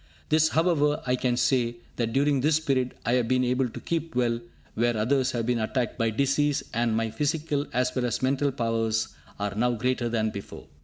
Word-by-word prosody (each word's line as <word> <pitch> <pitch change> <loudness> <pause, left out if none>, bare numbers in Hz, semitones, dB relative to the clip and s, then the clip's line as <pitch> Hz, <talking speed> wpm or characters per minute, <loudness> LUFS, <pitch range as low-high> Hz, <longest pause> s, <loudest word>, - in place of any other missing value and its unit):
This, 155 0 +4
however, 155 -3 +2
I 125 0 +2
can 125 -1 0
say, 120 -2 +2 0.2
that, 115 -1 0
during 140 +1 +2
this 155 +2 +3
period, 130 -5 0
I 120 - +2
have 125 -2 +2
been 130 +1 +2
able 125 0 +1
to - - -8
keep 165 -4 -3
well 120 -2 +1 0.3
where 120 0 +1
others 130 +4 +2
have 115 -2 -1
been 120 0 +1
attacked 120 +2 -2
by 115 0 +2
disease, 140 +5 +1
and 115 -1 +1
my 115 -1 -1
physical 150 0 -1
as 125 0 0
well 125 -1 0
as 120 +1 -2
mental 140 +2 +2
powers 115 -3 0 0.3
are 100 -1 -2
now 120 +4 +1
greater 120 +1 0
than 110 -2 0
before. 100 -1 -8
125 Hz, 200 wpm, -26 LUFS, 115-140 Hz, 0.3 s, This